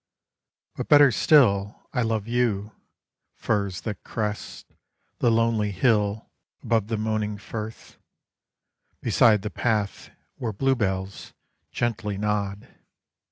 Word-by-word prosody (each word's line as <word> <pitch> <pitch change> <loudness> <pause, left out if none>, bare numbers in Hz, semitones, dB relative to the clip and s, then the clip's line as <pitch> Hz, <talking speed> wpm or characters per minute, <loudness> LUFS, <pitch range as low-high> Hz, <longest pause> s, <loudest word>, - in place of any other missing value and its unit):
But - - -5
better 145 -2 +7
still 105 -7 +3
I 125 - +1
love 110 -2 -1
you, 115 -4 0 0.6
firs 100 -3 -1
that 105 -4 -6
crest 105 -2 -4 0.5
The 120 - +3
lonely 115 -2 +2
hill 105 0 +1 0.4
above 110 -3 +1
the 110 -1 -2
moaning 105 -1 -2
firth, 110 +2 -8 1.0
Beside 105 -4 +4
the 105 - -4
path 105 -4 -1 0.3
where 115 -4 -3
bluebells 100 -6 -1 0.4
gently 105 -4 -2
nod. 105 -1 -2
105 Hz, 105 wpm, -25 LUFS, 100-115 Hz, 1.0 s, better